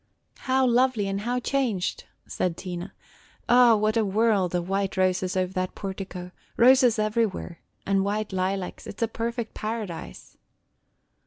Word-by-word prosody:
"How 260 0 +4
lovely 245 -4 +2
and 195 0 -2
how 245 +3 -1
changed!" 245 -8 -1 0.2
said 175 -2 -2
Tina. 180 0 -6 0.6
"O, 240 -2 +6
what 215 +1 +1
a 225 - +3
world 200 -3 +1
of 175 0 -1
white 195 0 -1
roses 185 0 +1
over 185 0 0
that 185 -1 -2
portico, 190 -2 -6
– - - -34
roses 250 -1 +6
everywhere, 215 -5 -1 0.3
and 195 -1 +2
white 205 0 -2
lilacs. 185 0 -2
It 205 - -8
is - - +1
a - - +2
perfect 230 0 -4
paradise!" 215 - -6
205 Hz, 150 wpm, -26 LUFS, 185-230 Hz, 0.6 s, O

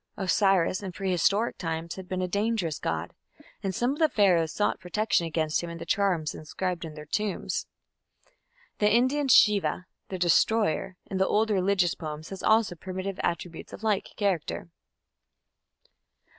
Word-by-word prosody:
Osiris 195 -1 +2
in 195 -2 -5
prehistoric 195 +4 +1
times 165 0 -3
had 190 -1 -9
been 185 0 -1
"a - - 0
dangerous 200 -4 -1
god", - - -3 0.5
and 190 -2 -2
some 245 +2 +1
of 290 - -8
the 315 -1 +4
Pharaohs 175 - +3
sought 205 - 0
protection 180 -1 0
against 155 -1 0
him 170 - -5
in 170 - -7
the - - -7
charms 180 -7 +1
inscribed 175 +3 -4
in 155 -2 -8
their 150 -1 -9
tombs. 210 +5 -2 1.1
The 210 0 +4
Indian 260 +5 +2
Shiva, 210 -6 +4 0.2
"the 190 - -3
Destroyer", 185 +1 +2
in 195 - -4
the 190 - +3
old 220 +1 +2
religious 190 -2 +2
poems 155 -1 -7
has 195 - -7
also 220 -3 +3
primitive 185 +3 -5
attributes 170 0 -4
of - - -9
like 210 -3 0
character. 190 -5 -1
190 Hz, 155 wpm, -27 LUFS, 170-210 Hz, 1.1 s, the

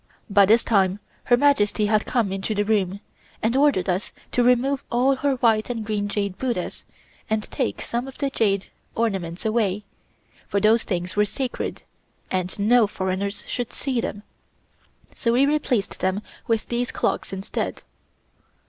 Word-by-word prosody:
By 200 -1 +6
this 225 +3 +5
time 195 -3 +2 0.3
her 245 - +5
Majesty 225 -6 +3
had 215 0 +2
come 230 -6 +1
into 195 +3 -2
the 205 0 +1
room, 200 -2 0 0.4
and 225 +3 +2
ordered 275 -10 +3
us 185 +2 -1 0.2
to 245 - +2
remove 250 +3 +3
all 260 +3 +3
her 280 0 +1
white 225 -3 +2
and 230 -3 -3
green 205 -1 -1
jade 200 -2 -2
Buddhas 240 -9 -3 0.4
and 220 -1 +1
take 260 -5 -2
some 240 +2 -2
of 270 - -10
the 280 -1 -1
jade 200 -6 0 0.2
ornaments 190 -6 -2
away, 210 -3 +1 0.6
for 200 - +1
those 220 +3 +4
things 180 -2 -3
were 210 0 +4
sacred, 255 +4 -4 0.5
and 185 -1 -1
no 220 +2 +4
foreigners 195 +1 -3
should 245 -1 -3
see 260 -4 -2
them, 205 -2 -5 0.9
so 230 -2 +1
we 260 +3 +5
replaced 280 -8 0
them 190 +3 0 0.2
with 225 -2 0
these 245 +1 0
clocks, - - -1
instead. 195 0 -4
215 Hz, 155 wpm, -24 LUFS, 200-245 Hz, 0.9 s, By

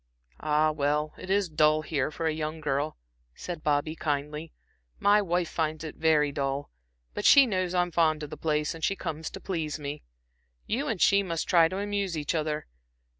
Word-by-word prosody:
"Ah, 155 +1 +2
well, 150 +1 0
it 185 - -9
is 200 0 +2
dull 155 -1 +3
here 145 -4 -1
for 165 +2 -5
a 160 - +1
young 155 +1 -4
girl," 145 0 -1 0.4
said 175 -3 -6
Bobby, 150 +1 0
kindly. 150 +1 -3 0.5
"My 205 +1 +4
wife 175 -2 0
finds 155 -1 -2
it 155 - -6
very 155 -2 +3
dull; 140 0 -3 0.4
but - - -4
she 280 -1 +8
knows 185 -5 -1
I'm 175 0 +1
fond 155 -2 +2
of 150 - -7
the - - -5
old - - -22
place, 150 -1 0
and 165 -1 -10
she 195 - +1
comes 160 -4 -4
to - - -8
please 160 -6 -3
me. 145 0 -6 0.6
You 270 +7 -1
and 220 -9 -2
she 200 +2 +5
must 170 -4 -3
try 170 -2 +5
to 185 +3 -5
amuse 200 -3 -2
each 150 -2 -2
other. 155 -2 -1
155 Hz, 195 wpm, -28 LUFS, 150-175 Hz, 0.6 s, she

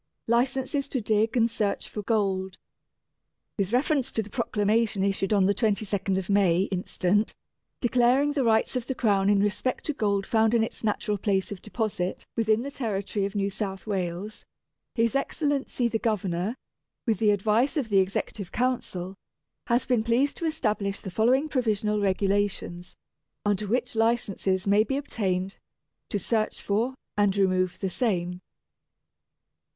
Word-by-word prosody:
Licenses 265 +4 0
to 260 - -1
Dig 220 +2 +1
and 230 -1 +4
Search 215 -3 -2
for 210 - -5
Gold. 195 -3 0 1.0
With 200 -1 -1
reference 270 +2 +1
to 220 - 0
the 210 - -13
Proclamation 215 -3 +1
issued 195 0 0
on 200 -3 +4
the 200 - +3
22nd 200 -4 0
May 190 -4 +3
instant, 190 +2 0 0.5
declaring 250 +4 +3
the 285 -2 0
rights 225 +2 +2
of 250 -1 -2
the 265 - -2
Crown 200 -5 +2
in 200 -1 +4
respect 210 +5 -1
to 300 - -2
Gold 200 -5 0
found 220 +1 +3
in 225 - +4
its 225 - -6
natural 210 -1 0
place 195 -1 0
of 200 - -6
deposit 210 -5 -3
within 220 0 +2
the 280 - -5
territory 205 -5 -2
of 200 +1 -5
New 200 0 0
South 195 -1 -4
Wales, 195 +1 -3 0.5
His 230 -2 +2
Excellency 275 -3 0
the 225 -1 -1
Governor, 200 -2 -1 0.5
with 220 -6 +1
the 215 - +3
advice 215 - +2
of 260 -7 -1
the 195 -2 +4
Executive 190 0 -2
Council, 235 -7 -2 0.5
has 240 +1 +2
been 245 -4 +2
pleased 245 +5 +2
to 335 - -3
establish 215 -10 -1
the 190 - -7
following 250 +9 +3
Provisional 215 -6 0
Regulations, 195 -2 -1 0.5
under 205 0 +1
which 245 +3 -1
Licenses 215 -5 +1
may 205 +1 +4
be 270 +4 -2
obtained, 195 -8 -2 0.5
to - - -1
search 215 +3 -1
for, 230 +6 0 0.2
and 205 -1 +2
remove 185 -2 +2
the 190 - -1
same: 180 -6 0
1. 180 0 -9
210 Hz, 155 wpm, -27 LUFS, 195-235 Hz, 1.0 s, and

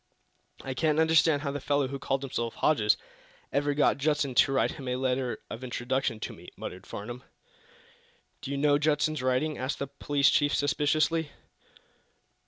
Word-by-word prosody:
"I 135 - -4
can't 155 +2 +1
understand 160 -2 +4
how 140 - -1
the 145 - -4
fellow 140 0 +1
who 140 0 -5
called 135 0 -1
himself 120 -3 -3
Hodges 105 -9 +3 0.6
ever 145 +1 +1
got 145 -2 +3
Judson 145 -2 +1
to 130 - +4
write 135 - +2
him 135 - -8
a 125 - 0
letter 130 -1 -1
of 120 - -7
introduction 125 -1 -2
to - - -4
me," - - -12
muttered 90 - -7
Mr. - - -19
Farnum. 120 +5 -7 1.2
"Do 135 - -6
you 140 - -2
know 145 0 +3
Judson's 150 -1 +1
writing?" 130 +4 0
asked 130 +3 -2
the 140 - -2
police 140 0 +1
chief, 145 -1 +2
suspiciously. 155 +2 +1
140 Hz, 170 wpm, -28 LUFS, 130-150 Hz, 1.2 s, understand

